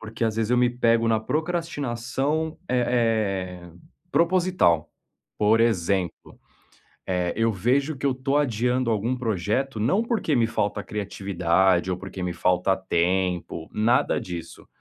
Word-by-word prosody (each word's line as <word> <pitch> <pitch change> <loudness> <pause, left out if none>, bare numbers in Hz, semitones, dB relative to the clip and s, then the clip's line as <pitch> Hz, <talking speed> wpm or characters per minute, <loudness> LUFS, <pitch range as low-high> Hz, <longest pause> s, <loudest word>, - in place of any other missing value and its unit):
Porque, 115 +2 -4
às 110 -1 -1
vezes, 115 0 0
eu 125 - +3
me 125 0 +3
pego 115 -1 +2
na 110 -1 +2
procrastinação, 150 -1 -2
eh 110 -7 0
eh, 85 -1 -13 0.4
proposital. 170 - +2 0.5
Por 110 +2 +4
exemplo, 95 -5 0 0.7
eh, 90 -2 0
eu 115 +1 +2
vejo 135 - 0
que 140 - -2
eu 135 - +2
tô 135 +2 -1
adiando 125 -2 +1
algum 115 +4 0
projeto 115 +2 -1
não 140 - +2
porque 230 -10 0
me 120 -3 +3
falta 105 -2 -2
criatividade 95 -3 0
ou 90 - -1
porque 95 0 -7
me 90 - -2
falta 90 +2 +1
tempo, 90 -2 -1
nada 120 +6 +2
disso. 85 -2 -8
115 Hz, 140 wpm, -24 LUFS, 95-130 Hz, 0.7 s, Por